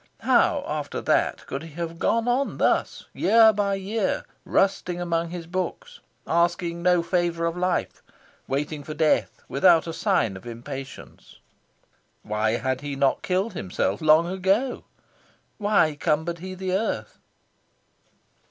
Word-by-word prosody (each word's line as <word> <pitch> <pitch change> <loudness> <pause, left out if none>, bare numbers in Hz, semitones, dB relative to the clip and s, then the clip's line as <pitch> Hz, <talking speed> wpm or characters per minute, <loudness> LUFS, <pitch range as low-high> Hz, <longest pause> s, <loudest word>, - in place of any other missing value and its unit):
How, - - +3
after - - -3
that, - - 0
could 135 - -5
he 165 -2 -10
have 165 0 -5
gone 230 +1 +1
on 255 +3 0
thus, - - 0
year 225 -1 +5
by 200 -1 0
year, 195 +2 -2 0.2
rusting 185 -2 +1
among 170 -1 -1
his 175 -1 -6
books, 190 - -4 0.3
asking 170 0 0
no 180 -1 +3
favour 170 -1 0
of 165 0 -1
life, 180 0 -1 0.5
waiting 145 +2 -2
for 155 +1 -7
death 155 0 +1
without 165 +3 +4
a 165 - -5
sign 165 - +1
of 95 +6 -11
impatience? 135 +4 -9 0.9
Why 110 +1 0
had 130 +2 -1
he 145 -1 -4
not 135 0 +1
killed 190 +4 -1
himself 95 - -2
long 155 +1 +5
ago? 190 +8 0 0.7
Why 200 -8 +2
cumbered 160 +2 0
he 185 +2 -7
the 185 0 -3
earth? 205 +4 -2
170 Hz, 135 wpm, -25 LUFS, 150-190 Hz, 0.9 s, year